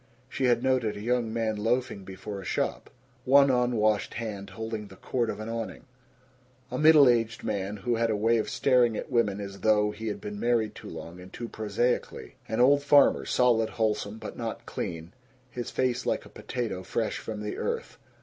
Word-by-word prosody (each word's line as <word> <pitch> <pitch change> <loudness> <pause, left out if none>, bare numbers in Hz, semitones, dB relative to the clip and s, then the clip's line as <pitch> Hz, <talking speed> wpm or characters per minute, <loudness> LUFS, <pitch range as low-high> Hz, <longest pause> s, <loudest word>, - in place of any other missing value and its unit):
She 130 - -2
had 120 -1 +3
noted 130 -5 +1
a - - -7
young 120 0 0
man 110 -1 -1
loafing 115 -1 -1
before 95 +1 -7
a - - -10
shop, - - -2 0.3
one 140 +1 +6
unwashed 115 -4 +1
hand 105 -4 -5
holding 110 +2 -5
the 95 - -13
cord 120 +3 -2
of - - -4
an 110 - -5
awning; 115 +2 -5 0.9
a 125 - -2
middle 155 -2 +7
aged 115 -2 +1
man 100 +1 -2
who 120 +4 -1
had 115 0 +1
a 110 - +1
way 115 +2 +2
of - - -2
staring 125 -4 +3
at - - -6
women 105 -4 +1
as 100 -1 -7
though 105 -1 +3
he 110 +2 -7
had 200 - -3
been 205 0 -6
married 115 - +1
too - - -10
long 85 +2 -9
and 90 +1 -12
too 120 - -6
prosaically; 110 +3 -2
an 110 - -2
old 140 +3 +5
farmer, 145 0 +5
solid, 115 -3 +3
wholesome, 110 -1 -1
but - - -8
not - - -5
clean 85 +2 -5 0.4
his 120 -1 -5
face 130 -2 0
like - - -1
a - - -13
potato 115 -7 -4
fresh 110 +4 -2
from 105 -1 -6
the 105 - -4
earth. 470 0 -4
115 Hz, 195 wpm, -28 LUFS, 105-125 Hz, 0.9 s, middle